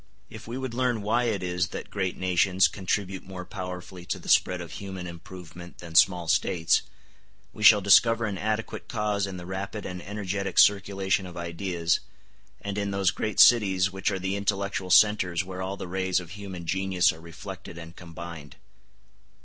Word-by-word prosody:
If 110 0 -10
we 120 +2 -5
would 130 -2 -4
learn 120 -3 0
why 115 +4 +1
it 105 -5 -1
is 90 +1 -1
that - - -8
great 95 -3 -2
nations 95 +1 +3
contribute 95 -1 -3
more 90 -1 -9
powerfully 90 -2 -7
to - - -2
the - - -10
spread 90 -1 +3
of 85 -1 -8
human 95 -2 -7
improvement 85 0 -10
than 85 -2 -10
small 90 0 +4
States, 85 -1 +2 0.7
we 110 - -11
shall 105 -1 +8
discover 115 +4 +5
an 100 -3 -3
adequate 110 +2 -3
cause 105 -3 -1
in 95 -1 -6
the 90 - -8
rapid 95 +3 -5
and 90 -1 -6
energetic 100 0 -4
circulation 95 -1 +3
of 90 0 -10
ideas, 85 0 -1 0.6
and 100 0 -4
in 100 0 -2
those 100 -2 +1
great 105 -2 -3
cities 100 -5 +6
which 95 +1 -1
are 100 - -2
the 95 +1 -2
intellectual 100 -1 -2
centres 95 -3 +4
where 95 0 -7
all 95 +1 -4
the 95 -1 -6
rays 95 0 0
of 90 -1 -10
human 95 -3 -8
genius 95 0 +2
are 80 - -13
reflected 85 +1 -9
and 85 0 -10
combined. 85 -3 -9
95 Hz, 175 wpm, -26 LUFS, 90-100 Hz, 0.7 s, shall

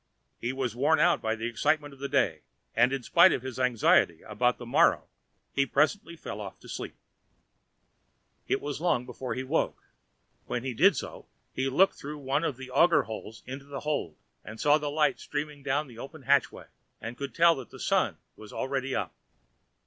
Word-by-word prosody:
He 120 - -2
was 130 -4 -3
worn 150 +5 +3
out 175 +3 +4
by 110 0 0
the 115 0 -5
excitement 145 +5 0
of 135 - -16
the 140 0 -4
day, 90 - +1 0.3
and 120 +3 +4
in 135 -2 -2
spite 170 +8 +6
of 125 - -1
his 130 -1 -6
anxiety 115 -9 +3
about 125 +4 0
the 120 - -9
morrow 120 - +4 0.5
he 140 - +3
presently 170 - +1
fell 105 -9 -7
off 100 -2 -8
to - - -14
sleep. - - -6 1.5
It - - 0
was 145 +1 -4
long 165 -8 +1
before 125 +1 -5
he 130 - -3
woke. 145 +5 -1 0.6
When 125 - -2
he 130 -1 -3
did 185 - +5
so, - - -7 0.3
he 135 +1 -1
looked 180 +9 +4
through 150 +2 -6
one 140 +2 -1
of 145 -6 -1
the 130 -1 -9
auger 165 0 +5
holes 110 0 -8
into 135 +2 -7
the 140 -1 -7
hold 145 - -2 0.3
and 110 +2 -9
saw 150 +1 +4
the 145 -1 -3
light 150 -1 +1
streaming 145 0 -5
down 140 +2 0
the 120 -4 -13
open 140 +3 -9
hatchway, 140 +1 +2 0.3
and 115 - -6
could 140 -2 -6
tell 170 0 +6
that 130 -4 -8
the - - -12
sun - - +1 0.2
was 110 -1 -12
already 135 0 -2
up. - - -2
135 Hz, 195 wpm, -28 LUFS, 120-150 Hz, 1.5 s, spite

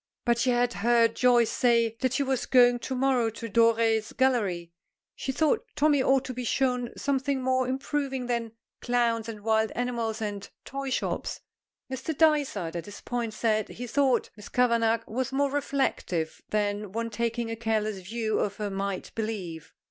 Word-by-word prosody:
But 235 -1 +2
she 255 +2 +2
had 245 0 +2
heard 230 +1 +3
Joyce 240 -2 +4
say 235 -2 +2
that 260 -1 0
she 280 - +1
was 265 -2 -1
going 245 -1 +5
to 260 - -4
morrow 255 -3 +2
to 230 +1 -7
Doré's 225 -1 +3
Gallery. 200 -10 0 0.4
She 265 - -3
thought 315 - +1
Tommy 290 -2 +3
ought 265 0 +3
to 255 - -5
be 250 0 -4
shown 250 -1 0
something 275 -1 0
more 260 0 +1
improving 270 0 -2
than 235 -2 -2 0.3
clowns 235 -2 +1
and 215 -2 -7
wild 220 0 +2
animals 235 -2 -2
and 205 -2 -4 0.2
toy 275 0 -4
shops. 255 - -2 0.5
Mr. 265 +3 -4
Dysart, 280 - +2
at 170 - -4
this 205 -1 -9
point, 235 -3 -3
said 215 -2 +1
he 245 - -6
thought 260 0 +1
Miss 210 -1 -11
Kavanagh 230 -2 +2
was 260 +3 -3
more 280 +1 +1
reflective 270 - -1
than 205 -1 -1
one 230 +1 -2
taking 230 +1 -2
a - - -2
careless 215 -3 -1
view 220 +3 -2
of 200 -1 -1
her 210 -2 -3
might 195 -1 -3
believe. 195 -8 -4
235 Hz, 170 wpm, -27 LUFS, 220-260 Hz, 0.5 s, going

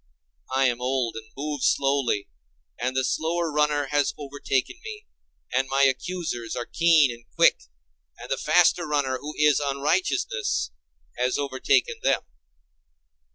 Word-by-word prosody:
I 135 0 +3
am 120 0 -1
old 125 -2 -1
and 110 0 -8
move 145 -1 -4
slowly, 135 -7 +1 0.5
and 125 +2 -2
the 130 - +2
slower 160 +5 -1
runner 150 -1 +1
has 145 -1 +1
overtaken 140 - -2
me, 425 -1 -8 0.5
and 130 +1 +1
my 135 +1 +2
accusers 135 -3 -1
are 120 - -3
keen 165 -4 +4
and 120 0 -11
quick, - - +5 0.6
and - - -10
the - - +1
faster 175 -2 +3
runner, 140 -4 0
who 150 +1 -7
is 150 -1 +4
unrighteousness, 140 - 0 0.5
has 125 +1 +1
overtaken 135 -2 +1
them. - - +2
140 Hz, 135 wpm, -25 LUFS, 130-150 Hz, 0.6 s, quick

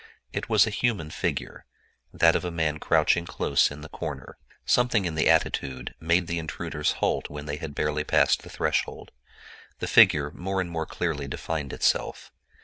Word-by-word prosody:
It - - -4
was - - +5
a 110 - -3
human 100 -8 -1
figure—that 85 0 -2
of - - 0
a 90 - -2
man 80 -2 -1
crouching 85 +2 +2
close 70 - +2
in 70 +1 -9
the 75 - -9
corner. 70 -6 -7 0.3
Something 120 -5 +2
in 85 - -2
the 80 - +2
attitude 65 -2 0
made 85 +2 +2
the 85 0 -2
intruders 75 -2 -2
halt - - -1
when 75 0 -7
they 75 0 -4
had 75 -3 -7
barely 75 0 -1
passed - - +3
the - - -12
threshold. - - -2 0.7
The - - -4
figure 75 -1 +5
more 95 +4 -3
and 90 -2 -2
more 80 -1 -3
clearly 75 -5 -3
defined 75 0 -4
itself. - - -1
80 Hz, 170 wpm, -26 LUFS, 75-85 Hz, 0.7 s, was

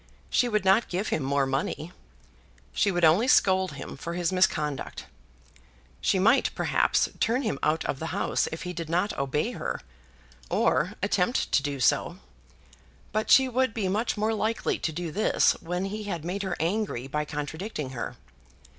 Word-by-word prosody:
She 245 - +3
would 210 -3 0
not 195 +5 +4
give 190 +4 -2
him - - 0
more 140 +1 +1
money. 135 +5 -2 0.8
She 205 - +2
would 175 -3 +2
only 175 +10 +4
scold 190 - +4
him 140 - -7
for 170 +5 -6
his 175 0 0
misconduct. 150 -6 0 1.0
She - - +2
might, 215 +8 +4
perhaps, - - +2
turn 245 +5 +1
him 215 - -2
out 155 +1 +1
of 135 - -2
the 160 - -4
house - - 0
if 160 - -5
he 180 0 -4
did 165 -2 -5
not 180 +5 0
obey 140 - -1
her, - - -4 0.7
or - - +2
attempt - - +1
to - - +4
do 140 -1 -3
so; 125 - +2 0.9
but 215 +1 -1
she 265 -1 +7
would 255 -1 0
be 210 -5 -1
much 215 +5 0
more 215 +2 +1
likely 220 +1 -1
to 160 - -1
do 170 +1 -4
this 210 +7 +3
when 180 +2 -2
he 210 +2 -5
had 170 -6 -4
made 190 +3 -2
her 190 -3 -3
angry 170 - -1
by 150 +3 -2
contradicting 150 +1 -5
her. 120 -3 -5
180 Hz, 170 wpm, -27 LUFS, 150-210 Hz, 1.0 s, she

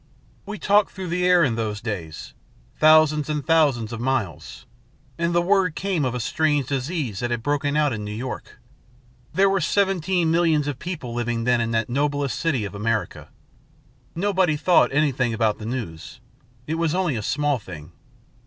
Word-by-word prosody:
"We 210 +1 -5
talked 205 +1 +3
through 190 -2 -6
the 180 +1 0
air 180 -1 +5
in 130 -6 +1
those 110 -2 -3
days, 90 -9 -6 0.5
thousands 155 -1 +5
and 150 -2 -2
thousands 140 -9 +2
of 115 - -5
miles. 125 -8 -3 0.5
And 170 0 +1
the 175 - +3
word 185 -3 +2
came 185 -7 -1
of 125 -1 -2
a - - -2
strange 145 +3 0
disease 135 - -3
that 120 - -2
had 120 -2 -2
broken 145 +1 0
out 150 -3 +2
in 105 -1 -4
New 105 - -5
York. 120 +5 -6 0.7
There 195 +4 +3
were 195 -1 +1
seventeen 180 -1 +1
millions 165 -3 +2
of 140 -3 -4
people 155 -9 -5
living 120 -1 -2
then 125 0 +2
in 115 - -1
that 115 -1 0
noblest 145 +1 -1
city 140 -10 0
of 100 - -7
America. 110 +1 -3 0.9
Nobody 185 -3 +1
thought 175 +4 +4
anything 135 -5 +1
about 110 -1 0
the 110 - -6
news. 110 -11 -6 0.5
It 160 +3 -3
was 165 -1 0
only 180 -7 0
a 110 - -3
small 145 +4 0
thing. 85 -5 -10
145 Hz, 175 wpm, -23 LUFS, 115-170 Hz, 0.9 s, air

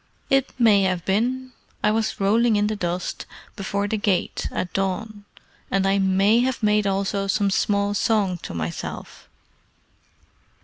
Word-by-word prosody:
"It 270 -1 +2
may 215 -4 +5
have 185 -3 0
been. 250 +6 0 0.3
I 210 - +4
was 220 0 -1
rolling 220 +3 +3
in 205 0 +2
the 215 +1 -1
dust 180 -2 -4 0.3
before 200 0 -2
the 220 - -1
gate 205 -3 -1
at 180 - -4
dawn, 200 +2 -3 0.4
and 195 0 +1
I 195 +1 +2
may 195 +4 +3
have 250 -1 -1
made 210 -1 +3
also 195 0 -1
some 200 0 +1
small 200 +1 +1
song 205 -4 +1
to - - -8
myself. 80 0 -6
200 Hz, 145 wpm, -23 LUFS, 195-220 Hz, 0.4 s, may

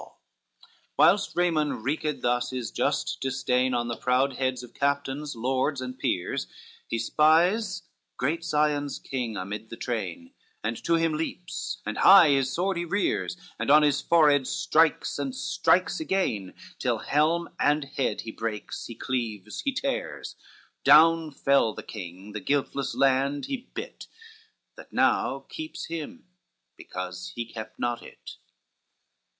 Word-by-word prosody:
LXXXIX - - -14 0.9
Whilst - - +4
Raymond 155 -8 +1
wreaked 150 0 -2
thus 125 +1 +1
his 125 -3 -4
just - - -1
disdain 130 -1 +1
On 120 0 0
the 120 - -2
proud 130 +2 +1
heads 130 -2 -1
of 120 - -12
captains, 140 0 -1
lords 130 +4 0
and 130 0 -6
peers, 90 - -1 0.4
He 115 - -2
spies 175 - +3 0.3
great 160 +6 -1
Sion's 150 -3 0
king 120 -5 -4
amid 105 +4 -5
the 115 - -8
train, 95 -8 -4 0.3
And 110 +2 -3
to 170 - +3
him 165 -1 +1
leaps, 180 +5 -4
and - - -3
high 190 -5 +8
his 135 -2 +2
sword 185 +1 0
he 175 - -1
rears, 190 0 -1 0.2
And - - -2
on 150 +1 +7
his 145 -2 +2
forehead 145 -5 +4
strikes, 160 0 +2
and 265 -1 -3
strikes - - +1
again, 185 - -1 0.2
Till - - 0
helm 160 +4 +1
and 145 +1 +3
head 135 -1 -2
he 115 - -7
breaks, 110 -2 -5
he 115 - -8
cleaves, 110 -6 -3
he 275 - +1
tears; 270 +1 -3 0.5
Down 160 +3 +6
fell 140 -5 +2
the - - -7
king, 95 0 -9
the 105 - -5
guiltless 140 +3 -1
land 135 +1 +2
he 265 -2 -5
bit, 455 +6 -7 0.7
That - - -13
now - - +1
keeps 315 -1 -6
him, 165 +11 -7 0.5
because 90 0 -7
he 120 - -3
kept 110 -1 -9
not 120 -1 -2
it. - - -12
140 Hz, 145 wpm, -27 LUFS, 120-165 Hz, 0.9 s, high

